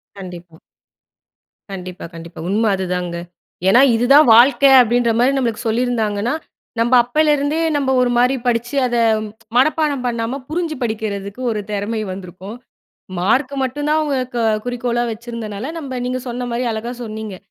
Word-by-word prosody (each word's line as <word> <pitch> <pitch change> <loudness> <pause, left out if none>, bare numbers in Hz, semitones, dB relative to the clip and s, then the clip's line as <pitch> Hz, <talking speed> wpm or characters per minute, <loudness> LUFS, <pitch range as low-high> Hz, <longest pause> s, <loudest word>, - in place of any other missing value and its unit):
கண்டிப்பா. 175 -4 -10 1.1
கண்டிப்பா 185 -1 -7
கண்டிப்பா 165 0 -10
உண்மை 220 +3 +1
அதுதாங்க. 180 -2 -3 0.5
ஏன்னா 240 +7 +6
இதுதான் 275 +5 +5
வாழ்க்கை 275 +4 +6
அப்படின்ற 240 0 +2
மாரி 255 +3 +4
நம்மளுக்கு 235 -2 -2
சொல்லியிருந்தாங்கன்னா, 225 -1 0 0.5
நம்ம 240 +2 +1
அப்போலேருந்தே 295 +3 +1 0.2
நம்ம 265 -2 0
ஒரு 250 - +2
மாதிரி 250 +2 +3
படிச்சு 240 +2 -1
அதை 240 -1 0 0.6
மனப்பாடம் 290 -1 +2
பண்ணாமல் 240 +3 -3
புரிஞ்சு 330 -1 -2
படிக்கிறதுக்கு 210 -1 -4
ஒரு 210 -1 -2
திறமை 210 +2 -2
வந்திருக்கும். 190 +4 -9 0.6
மார்க் 255 +9 +1
மட்டும் 290 +3 -3
தான் 310 +1 +3
அவங்க 260 -5 -2 0.3
குறிக்கோளா 245 -1 -1
வச்சிருந்தனால 230 +2 -6
நம்ம 260 -5 -5
நீங்க 255 0 -2
சொன்ன 245 +1 -4
மாதிரி, 245 +1 -1
அழகா 225 +3 -4
சொன்னீங்க. 215 -3 -6
240 Hz, 130 wpm, -19 LUFS, 210-260 Hz, 1.1 s, ஏன்னா